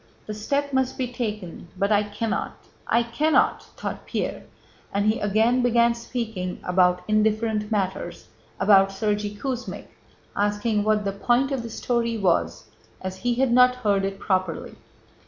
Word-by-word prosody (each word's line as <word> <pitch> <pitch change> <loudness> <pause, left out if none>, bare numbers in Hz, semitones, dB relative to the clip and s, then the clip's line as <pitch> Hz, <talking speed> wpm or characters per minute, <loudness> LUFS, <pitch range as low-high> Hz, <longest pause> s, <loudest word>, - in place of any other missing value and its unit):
"The 215 - -5
step 280 +7 -2
must 265 -1 +1
be 250 -1 -3
taken 210 -9 -5
but 200 +3 +1
I 205 -1 +5
cannot, 210 +2 -3 0.3
I 235 - +3
cannot!" 290 +7 +2 0.2
thought - - -5
Pierre, - - -3 0.5
and 200 +1 0
he 215 +3 +2
again 220 +5 +2
began 235 -1 +4
speaking 225 -6 -4
about 180 0 +2
indifferent 215 0 +1
matters, 190 -4 -2 0.3
about 195 0 +5
Sergéy 205 +1 -2
Kuzmích, 255 +1 -4 0.5
asking 205 +1 +1
what 210 -1 +1
the 195 - 0
point 240 +7 +1
of 270 -3 -1
the 230 - -7
story 235 0 -1
was 185 - 0 0.3
as 185 0 -5
he 240 +4 0
had 260 0 +2
not 250 0 +6
heard 205 -5 +1
it 195 0 -2
properly. 185 -4 -2
215 Hz, 150 wpm, -24 LUFS, 200-240 Hz, 0.5 s, not